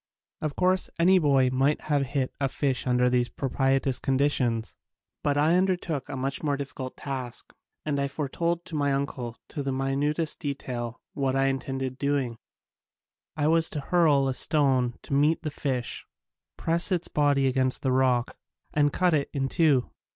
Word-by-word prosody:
Of 155 -2 -2
course 185 +1 +1
any 185 +3 +5
boy 135 -5 +3
might 135 +3 +2
have 145 -3 0
hit 135 -1 -1
a 135 - +2
fish 135 -1 -1
under 125 0 +3
these 125 -1 +2
pro 135 - -4
pitious 135 -1 +1
conditions 130 -5 0 0.5
but 145 0 +1
I 155 +4 +4
undertook 180 -6 0
a - - -4
much 135 +2 -2
more 145 -2 0
difficult 135 -2 -6
task 130 -4 -5 0.3
and 145 -2 0
I 140 - +1
foretold 170 +5 -2
to 175 -3 -7
my 145 -2 +1
uncle, 130 -4 -3
to 145 - -4
the 135 -1 -2
minutest 140 +4 -1
detail, 125 -4 -4
what 135 -2 0
I 135 0 +3
in 135 0 -1
tended 135 -1 -4
doing. 140 -5 -1 1.0
I 145 - +1
was 165 +1 +3
to 150 - -3
hurl 145 -3 +3
a 135 - 0
stone 130 -4 +2
to - - -6
meet 150 +4 +3
the 155 - -3
fish, 130 -4 -3 0.5
press 170 +4 +1
its 175 -2 0
body 145 -2 +2
against 130 -1 +1
the 130 - +1
rock, 130 -2 +2 0.4
and 145 -1 +3
cut 180 +2 +2
it 145 -2 +1
in 135 -1 -1
two. 145 -6 +2
140 Hz, 175 wpm, -27 LUFS, 130-150 Hz, 1.0 s, any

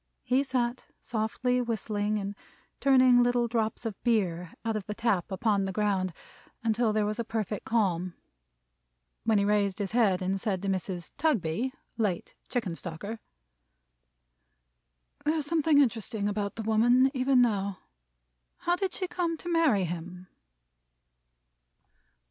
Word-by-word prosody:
He 260 +2 +2
sat 250 -2 -1
softly 245 +3 -1
whistling, 215 -2 -1
and 200 0 -3 0.5
turning 255 -2 +6
little 245 0 +2
drops 225 0 -1
of 220 -4 -4
beer 180 -8 +1
out 225 -1 0
of 210 -3 -4
the 210 - -4
tap 210 -6 0
upon 200 -1 +1
the 190 - -2
ground, 195 -2 0 0.5
until 225 0 +2
there 215 0 +1
was 210 +2 -2
a - - +1
perfect 215 -2 -3
calm: 185 -6 0 1.1
when 220 -1 +4
he 200 - +2
raised 205 -2 +2
his 200 -3 -3
head 205 -6 +3
and 190 +1 -1
said 195 -4 -1
to - - -2
Mrs. 185 -2 -2
Tugby, 245 - +1 0.3
late 200 -6 -1 0.2
Chickenstalker: 200 -2 -4 2.0
"There's 305 -1 +1
something 315 -1 +3
interesting 225 -5 +1
about 205 -1 -2
the 225 - -4
woman, 240 +5 +4
even 260 -1 +3
now. 200 -5 +1 0.8
How 350 - +2
did 380 -1 -2
she 370 - -2
come 340 -2 -1
to 350 - -7
marry 320 - +3
him?" 175 +1 -5
220 Hz, 135 wpm, -29 LUFS, 195-245 Hz, 2.0 s, turning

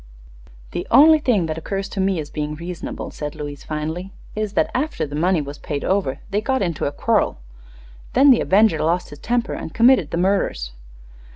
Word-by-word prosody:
"The - - -4
only 310 +5 +7
thing 230 - +1
that 160 0 -3
occurs 195 +4 -3
to - - -6
me 190 -2 +1
as 150 -1 -6
being 150 0 -4
sensible," 170 +1 -6
said 150 0 -6
Louise, 145 -2 -7
finally, 160 +5 -4 0.2
"is 215 -1 -2
that - - +1
after 295 - -1
the 145 0 -7
money 175 +2 +2
was 140 +1 -8
paid 145 -1 -4
over 185 -9 0
they 205 +2 +1
got 265 0 0
into 170 -5 -2
a - - -2
quarrel. - - +1 0.8
Then 275 +2 +6
the 245 - +4
avenger 200 -4 +3
lost 170 +3 0
his 145 - -10
temper 240 0 -1
and 160 - -7
committed 230 - +5
the - - -3
murders." 175 - 0
180 Hz, 190 wpm, -21 LUFS, 150-215 Hz, 0.8 s, only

